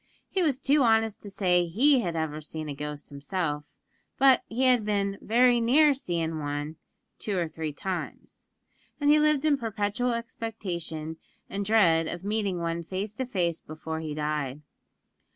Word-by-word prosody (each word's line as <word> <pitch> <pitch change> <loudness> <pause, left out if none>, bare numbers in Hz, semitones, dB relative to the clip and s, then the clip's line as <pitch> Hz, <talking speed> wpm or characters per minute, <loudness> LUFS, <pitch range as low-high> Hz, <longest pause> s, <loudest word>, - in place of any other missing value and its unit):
He 380 - -1
was 295 -7 +2
too 285 +2 +3
honest 225 -3 +2
to 205 - -8
say 180 -3 +2
he 260 - +4
had 175 -7 -2
ever 155 -1 -2
seen 155 0 -6
a 145 - -4
ghost 150 +1 -6
himself; 150 +1 -3 0.5
but 265 -2 +6
he 240 +4 -1
had 250 -3 +4
been 200 -1 -1
"very 240 +1 +4
near 285 +6 +5
seein' 165 - -2
wan 145 +1 -4 0.4
two 205 -3 -2
or 170 -2 0
three 160 -1 -4
times," 180 +5 -6 0.5
and 290 0 +4
he 305 - +6
lived 305 -1 +3
in 295 -2 +4
perpetual 225 +1 -1
expectation 180 -9 -5 0.3
and 200 +1 -2
dread 180 -7 +4
of 175 +2 -5
meeting 205 -2 -1
one 170 0 -2
face 195 +5 -4
to 255 +3 -4
face 175 -7 -1
before 160 +1 -6
he 155 -2 -5
died. 150 -2 -2
190 Hz, 165 wpm, -27 LUFS, 160-235 Hz, 0.5 s, but